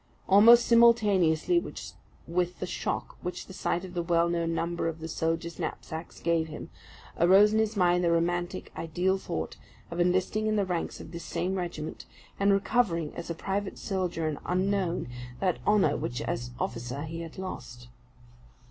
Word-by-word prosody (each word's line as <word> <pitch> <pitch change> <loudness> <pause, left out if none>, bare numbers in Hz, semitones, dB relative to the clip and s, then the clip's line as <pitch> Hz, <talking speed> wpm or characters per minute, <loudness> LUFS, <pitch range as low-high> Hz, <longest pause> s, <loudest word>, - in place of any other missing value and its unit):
Almost 230 +5 +8
simultaneously 225 - +4 0.7
with 180 +1 -1
the - - -2
shock - - -3
which 180 - -5
the 190 - -11
sight 180 -1 -1
of 180 - -10
the 175 - -1
well 170 0 +2
known 170 -1 0
number 170 0 -1
on 160 - -6
the 160 0 -6
soldiers' 165 +1 -2
knapsacks 160 +1 -5
gave 165 -1 +1
him, 155 - -8 0.5
arose 195 +5 +6
in 220 - +3
his 220 -1 0
mind 180 -1 +3
the 170 - +3
romantic, 175 +2 -1
ideal 180 +4 0
thought, 80 - -4 0.3
of 170 - -4
enlisting 185 +5 +1
in 215 - +1
the 205 -2 +2
ranks 175 -3 -3
of 155 - -10
this 170 0 -7
same 175 +3 -2
regiment, 175 -4 -5 0.3
and 200 0 +4
recovering, 195 -6 +1
as 170 - -6
a 170 - -2
private 195 +3 -3
soldier 180 -5 -2
and 155 -2 -3
unknown, 185 -1 0 0.3
that 185 -3 0
honour 200 -9 +4
which 120 - -3
as 120 +1 -3
officer 120 +4 -3
he 165 +1 -5
had 165 -1 -9
lost. 125 -10 -7
175 Hz, 165 wpm, -28 LUFS, 165-195 Hz, 0.7 s, Almost